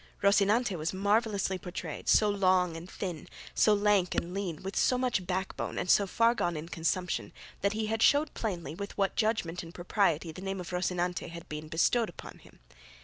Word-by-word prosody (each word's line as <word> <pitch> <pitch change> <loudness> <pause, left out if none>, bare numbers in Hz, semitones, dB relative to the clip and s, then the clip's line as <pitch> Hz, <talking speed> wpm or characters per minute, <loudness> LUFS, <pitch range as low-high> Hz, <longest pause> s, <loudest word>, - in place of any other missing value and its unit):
Rocinante 200 +2 +3
was 165 +3 -3
marvellously 200 -1 +1
portrayed, 175 -3 -6
so 215 - +5
long 185 -4 +2
and 165 +3 -8
thin, 180 -4 -5 0.3
so 215 - +4
lank 205 -3 +2
and 175 +1 -2
lean, 185 -5 -4
with 195 +1 -5
so 255 - +3
much 245 -8 0
backbone 190 +1 -3
and 180 - +1
so 200 - +4
far 230 +4 +3
gone 175 -8 -1
in 160 +2 -7
consumption, 175 +2 -1 0.3
that 200 +1 +1
he 220 0 -1
showed 290 +6 +4
plainly 175 -9 -4
with 200 +4 -7
what 195 -1 +1
judgment 215 -6 0
and 165 0 -11
propriety 175 -3 +1
the 185 - -10
name 195 0 -3
of 180 -1 -7
Rocinante 180 -1 -1
had 170 0 -9
been 150 +1 -6
bestowed 215 +9 +2
upon - - -11
him. - - -19
185 Hz, 185 wpm, -30 LUFS, 175-205 Hz, 0.3 s, so